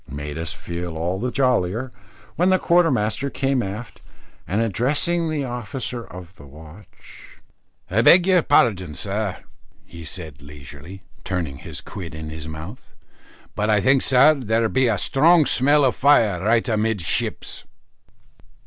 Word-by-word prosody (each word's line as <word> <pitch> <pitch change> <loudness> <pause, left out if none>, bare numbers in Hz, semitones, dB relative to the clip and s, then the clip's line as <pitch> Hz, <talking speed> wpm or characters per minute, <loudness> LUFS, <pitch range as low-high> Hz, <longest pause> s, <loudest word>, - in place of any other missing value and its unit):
and 70 - -8
made 75 0 -6
us 80 0 -3
feel 85 -1 -6
all 90 +4 -2
the 125 +4 -2
jollier, 125 -2 0 0.4
when 180 +2 +2
the 185 - +4
quartermaster 140 - +1
came 135 -1 -1
aft, 105 +3 -7 0.5
and 100 +5 -1
addressing 145 - 0
the 150 -2 -2
officer 125 0 -5
of 90 -2 -12
the - - -14
watch 80 +7 -16 0.5
"I 110 +5 +1
beg 175 +9 +6
your 185 -2 +4
pardon, 95 - +2
sir," 100 +5 -4 0.4
he 85 -1 -11
said, 80 -3 -8
leisurely, 75 +6 -12 0.2
turning 85 -8 -4
his - - -8
quid 85 -5 -8
in 80 0 -7
his 80 0 -8
mouth, 80 +9 -10 0.6
"but 105 +1 -2
I 105 -1 +3
think, 130 +6 +3
sir, 135 +4 +5
there 115 -5 0
be 130 +1 +2
a 110 -3 +1
strong 155 - +4
smell 145 +3 +3
of 130 - +1
fire 110 -10 +3
right 115 +3 +2
amidships." 110 -6 -1
110 Hz, 150 wpm, -22 LUFS, 85-130 Hz, 0.6 s, beg